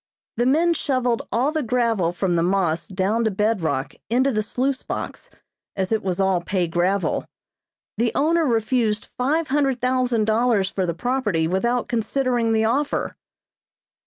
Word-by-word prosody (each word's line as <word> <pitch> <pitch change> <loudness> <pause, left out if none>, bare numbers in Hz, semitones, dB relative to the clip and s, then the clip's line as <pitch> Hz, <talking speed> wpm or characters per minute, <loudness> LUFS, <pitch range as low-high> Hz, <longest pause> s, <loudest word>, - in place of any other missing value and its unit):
The 240 +2 +2
men 330 +6 +3
shovelled 255 -6 0
all 255 +6 +1
the 310 0 -1
gravel 230 - +1
from 175 0 -1
the 165 - +2
moss 175 -2 0
down 200 +4 0
to - - +3
bedrock 195 -9 -1 0.2
into 260 +4 +2
the 215 -3 0
sluice 260 +5 -1
box - - -6 0.5
as 190 0 -2
it 220 - +1
was 185 -1 -2
all 190 -2 +2
pay 180 0 -1
gravel. 180 +4 0 0.7
The 235 0 +2
owner 325 +2 +2
refused 225 -2 +1
five 300 +6 -1
hundred 270 -2 +1
thousand 250 -3 +1
dollars 220 -3 +2
for 190 -2 -1
the 170 - -2
property 210 -8 0
without 235 +8 0
considering 240 0 0
the 220 0 +2
offer." 275 +6 -1
225 Hz, 155 wpm, -22 LUFS, 190-255 Hz, 0.7 s, men